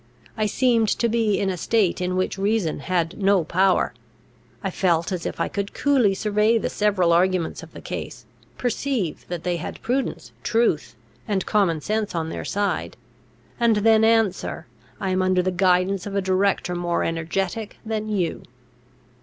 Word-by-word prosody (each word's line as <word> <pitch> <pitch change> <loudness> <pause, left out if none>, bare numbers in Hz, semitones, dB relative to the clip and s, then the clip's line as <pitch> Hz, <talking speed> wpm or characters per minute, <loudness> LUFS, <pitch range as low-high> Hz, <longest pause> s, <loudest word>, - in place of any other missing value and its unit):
I 215 -1 0
seemed 230 0 +2
to 235 - +1
be 225 -3 +1
in 195 -1 0
a 180 - -4
state 195 -1 +1
in 180 0 -1
which 185 +1 -1
reason 200 -6 0
had 175 +4 -1
no 195 -2 +4
power. 185 +3 +2 0.7
I 195 - -1
felt 170 -1 +1
as 180 -3 -2
if - - -6
I - - +1
could 200 -1 -4
coolly 255 -9 +3
survey 210 +3 +2
the - - -2
several 195 -5 +2
arguments 180 -1 +1
of - - -13
the - - -10
case, - - -6 0.3
perceive 245 - -2
that 175 -2 -5
they 175 -1 0
had 170 - -6
prudence, 260 +3 -2
truth, 165 - +1 0.3
and 200 -3 0
common 185 -7 +1
sense 215 +1 -2
on 160 -1 -2
their - - -5
side; 205 0 -2 0.6
and 235 -2 +4
then 220 +1 +4
answer, 225 -4 +1 0.3
I 190 - -1
am 185 0 +1
under 185 -1 +2
the 185 - 0
guidance 185 +1 +2
of 200 - -5
a - - +3
director 190 -1 +1
more 175 -1 -1
energetic 180 +6 -2
than 215 -1 -3
you. 185 -6 -1
195 Hz, 170 wpm, -23 LUFS, 180-215 Hz, 0.7 s, no